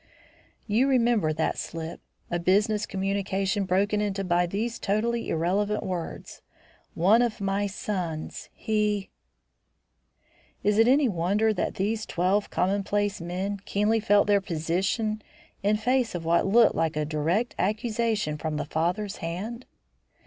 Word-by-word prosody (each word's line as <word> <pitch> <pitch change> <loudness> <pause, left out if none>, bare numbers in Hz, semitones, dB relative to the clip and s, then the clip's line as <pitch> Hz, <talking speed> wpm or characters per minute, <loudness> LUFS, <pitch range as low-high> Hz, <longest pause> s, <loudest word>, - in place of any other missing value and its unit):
You 230 +5 +2
remember 235 - +3
that 160 +1 -1
slip; 165 0 -6 0.3
a 175 - 0
business 210 +4 +2
communication 195 0 -1
broken 200 +3 +1
into 200 -1 -1
by 175 -1 +2
these 225 +6 -3
totally 230 +4 0
irrelevant 200 +6 0
words, 180 -3 -5 0.5
"one 200 +8 +5
of 235 -2 0
my 200 +1 0
sons 180 -5 -4
He". 210 -2 -1 1.5
Is 210 +1 +2
it 225 - +6
any 270 +2 +5
wonder 205 +3 +1
that 190 - -2
these 215 +3 -1
twelve 185 +4 +1
commonplace 200 +1 0
men 185 +4 -3
keenly 210 +3 +1
felt 205 -1 +4
their 205 -1 +3
position 190 +6 -1 0.4
in 210 +1 +2
face 245 0 +1
of 165 -2 -4
what 170 +3 +3
looked 230 +4 +5
like 160 -1 0
a 155 0 0
direct 165 +10 0
accusation 215 - 0
from 155 -1 -2
the - - -2
father's 180 +7 -1
hand? 205 +9 -5
200 Hz, 135 wpm, -26 LUFS, 175-215 Hz, 1.5 s, it